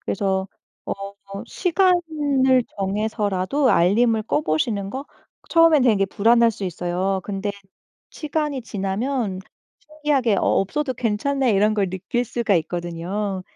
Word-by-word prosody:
그래서 190 -1 -1 0.4
어 - - -2 0.5
시간을 310 -9 +2 0.2
정해서라도 210 +5 0
알림을 215 +5 +3
꺼보시는 195 +5 -1
거? 265 +5 -5 0.4
처음엔 330 -4 +5
되게 210 -6 +3
불안할 230 +4 +4
수 205 -2 -7
있어요. 180 +2 -2
근데 200 0 -3 0.6
시간이 300 -3 -3
지나면 205 +1 -2 0.4
신기하게 295 -8 0
'어. - - +1 0.2
없어도 265 +7 -2
괜찮네.' 250 +3 0
이런 210 +2 +3
걸 195 -3 0
느낄 205 +7 -2
수가 230 -3 0
있거든요. 175 +4 -3
215 Hz, 275 characters per minute, -22 LUFS, 195-265 Hz, 0.6 s, 처음엔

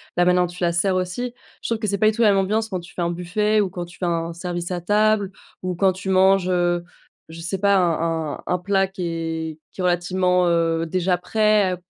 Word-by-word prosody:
la 175 - +3
manière 180 0 +4
dont 180 - 0
tu 175 +1 -7
la 170 - +3
sers 185 +3 +1
aussi. 185 +7 -2 0.3
Je - - -4
trouve 230 - 0
que 215 - -2
c'est 200 0 0
pas 215 - +4
du 215 - -2
tout 235 - -1
la 215 - +6
même 195 - +3
ambiance 215 +3 0
quand 185 -3 -3
tu 175 0 -13
fais - - -3
un 170 - 0
buffet 210 +5 +1
ou 195 - -1
quand 175 -1 -5
tu 175 - -15
fais 185 - -1
un 165 -1 -1
service 175 0 -4
à 175 -1 -2
table 210 +1 +2 0.3
ou 185 -1 -3
quand 190 +2 +3
tu 185 +1 -6
manges, 190 0 +4
heu, 175 -1 +1 0.5
je 165 +1 -10
sais 180 +3 -3
pas, 200 +1 +3
un 165 -3 0
un - - -15
un 180 - +1
plat 195 +1 +1
qui 190 -1 -7
est 165 -1 -4
qui - - -7
est - - -2
relativement, 180 0 +2
heu, 165 -1 +1
déjà 180 +1 +1
prêt, 210 -1 +2
180 Hz, 250 wpm, -22 LUFS, 170-195 Hz, 0.5 s, la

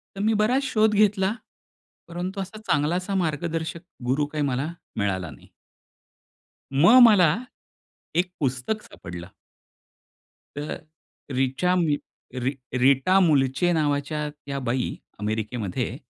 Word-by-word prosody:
तर 195 - -4
मी 220 +1 +3
बराच 250 +6 +2
शोध 220 -4 +2
घेतला. 200 -1 +3 0.7
परंतु 180 +3 -4
असा 195 +3 -7
चांगला 150 +3 +2
असा 185 +2 -2
मार्गदर्शक 165 +1 -2 0.3
गुरू 135 +4 +1
काही 150 -1 0
मला 135 +1 -1 0.3
मिळाला 95 -4 -1
नाही. - - -15 1.3
मग 175 - +7
मला 180 -8 +5 0.8
एक 180 +1 +2
पुस्तक 135 - -1
सापडलं. 85 0 -9 1.3
तर 145 +1 -3 0.6
रिचा 135 +8 +1
मु 165 -5 +2 0.5
री 130 - +1 0.3
रीटा 140 +8 +5
मुलचे 145 +3 +2
नावाच्या 150 -1 0
त्या 140 -2 -6
बाई 125 +1 -1 0.2
अमेरिकेमध्ये 110 -1 -3
150 Hz, 110 wpm, -25 LUFS, 130-185 Hz, 1.3 s, मग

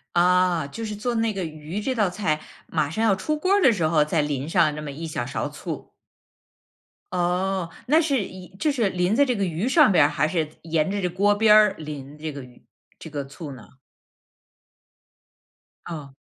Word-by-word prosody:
啊， 180 -2 +3
就 225 +11 -7
是 210 -1 -4
做 235 +4 -2
那 225 -1 +1
个 195 -2 -3
鱼 155 +4 -6
这 260 +5 -1
道 210 -6 +1
菜， 170 -5 -1 0.3
马 155 -3 0
上 220 +8 -2
要 215 -3 +4
出 305 +11 -2
锅 370 +6 +1
儿 405 - +4
的 265 - +6
时 175 -8 +1
候， 155 -1 +3
再 150 +1 +1
淋 145 -2 -2
上 165 -4 +3
这 150 - -6
么 150 -1 -6
一 155 +4 -7
小 135 -6 -3
勺 - - -3
醋。 - - -7 1.2
哦， 180 0 0 0.2
那 310 +5 +4
是 280 -6 +1
一 185 -1 -10
就 305 - +1
是 235 -8 +1
淋 180 +2 0
在 285 - +5
这 250 -3 0
个 200 -2 0
鱼 180 +7 -2
上 295 -5 +6
边 160 - +6
儿， - - +2
还 155 -1 +1
是 155 -2 -1
沿 160 +2 0
着 200 0 -2
这 180 - +1
锅 195 +4 +2
边 210 +1 +5
儿 210 -2 +6
淋 150 -2 -8
这 155 0 -5
个 140 -1 -7
鱼 125 -1 -17 0.3
这 160 - -9
个 145 -2 -4
醋 140 +1 -8
呢？ 130 0 -15 2.1
嗯。 150 -5 -7
180 Hz, 220 characters per minute, -24 LUFS, 155-210 Hz, 2.1 s, 的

